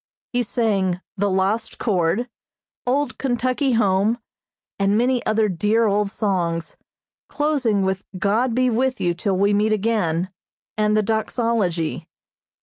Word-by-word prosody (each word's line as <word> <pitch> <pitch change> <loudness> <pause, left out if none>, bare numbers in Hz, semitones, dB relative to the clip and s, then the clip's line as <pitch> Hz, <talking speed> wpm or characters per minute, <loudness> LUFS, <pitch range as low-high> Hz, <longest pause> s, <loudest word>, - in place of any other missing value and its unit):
He 245 - +2
sang 200 -6 0 0.2
the 205 0 0
"Lost 195 +4 0
Chord," 195 +2 0 0.6
"Old 285 +4 0
Kentucky 255 +1 0
Home," 210 0 +2 0.6
and 200 +1 +2
many 245 +1 +1
other 215 0 +2
dear 210 +5 +1
old 205 -1 +1
songs, 175 -6 -2 0.5
closing 270 -9 +1
with 190 0 -1
"God 225 +6 +1
Be 255 0 +3
With 250 +2 0
You 175 -1 +1
Till 185 +2 -1
We 200 +2 +3
Meet 210 +1 +2
Again," 190 -5 0 0.4
and 215 0 +2
the 215 - +3
doxology. 220 -6 -1
215 Hz, 130 wpm, -22 LUFS, 190-235 Hz, 0.6 s, Be